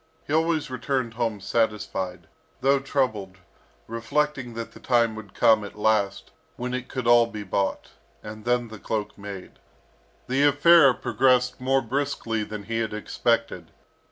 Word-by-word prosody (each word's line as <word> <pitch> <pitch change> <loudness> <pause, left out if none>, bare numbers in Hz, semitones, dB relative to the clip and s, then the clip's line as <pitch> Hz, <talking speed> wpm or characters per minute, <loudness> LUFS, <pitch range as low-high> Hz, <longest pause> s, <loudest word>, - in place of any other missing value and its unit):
He 145 - -4
always 160 -3 +1
returned 130 -2 -2
home 115 -3 -2
satisfied, 100 -3 -2 0.4
though 140 +1 +3
troubled, 110 -9 -2 0.5
reflecting 125 +2 -2
that 115 0 -5
the - - -14
time 120 -3 +2
would 110 -3 -10
come 110 -2 +4
at 100 - -9
last 105 -2 0 0.2
when 125 +1 -4
it 125 0 -3
could 130 -3 -4
all 120 0 +6
be 110 -2 -7
bought, 100 0 -2 0.3
and 110 0 -9
then 120 0 0
the 110 -1 -10
cloak 105 0 -3
made. 100 -2 -9 0.7
The 130 +2 +1
affair 145 -1 +6
progressed 125 -1 +1
more 135 0 +2
briskly 120 -3 -2
than 105 -1 -7
he 115 +2 -3
had 110 -2 -2
expected. 110 -5 -1
115 Hz, 150 wpm, -25 LUFS, 105-130 Hz, 0.7 s, all